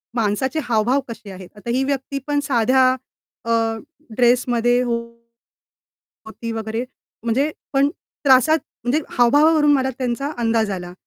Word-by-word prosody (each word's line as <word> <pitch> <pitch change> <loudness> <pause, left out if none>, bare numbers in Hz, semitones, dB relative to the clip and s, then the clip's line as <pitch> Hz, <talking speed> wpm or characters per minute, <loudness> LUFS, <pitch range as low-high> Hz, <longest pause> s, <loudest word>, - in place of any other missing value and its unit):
माणसाचे 240 +6 0
हावभाव 240 +4 +1
कसे 215 -3 -9
आहेत? 185 -1 -10
आता 210 +3 -9
ही 265 - +1
व्यक्ती 275 0 -2
पण 290 0 +1
साध्या 260 0 +3 0.6
अ, - - -5 0.7
ड्रेसमध्ये 245 0 +3
होती 235 -1 -7 1.0
वगैरे 225 +2 -3 0.4
म्हणजे 250 +6 +1 0.2
पण 275 +1 +3 0.4
त्रासात 275 +4 +5 0.3
म्हणजे 265 +6 +1 0.2
हावभावावरून 295 +5 +5
मला 265 -2 +2
त्यांचा 255 +3 -2
अंदाज 225 -2 +1
आला. 180 -2 -5
245 Hz, 120 wpm, -21 LUFS, 230-270 Hz, 1.0 s, त्रासात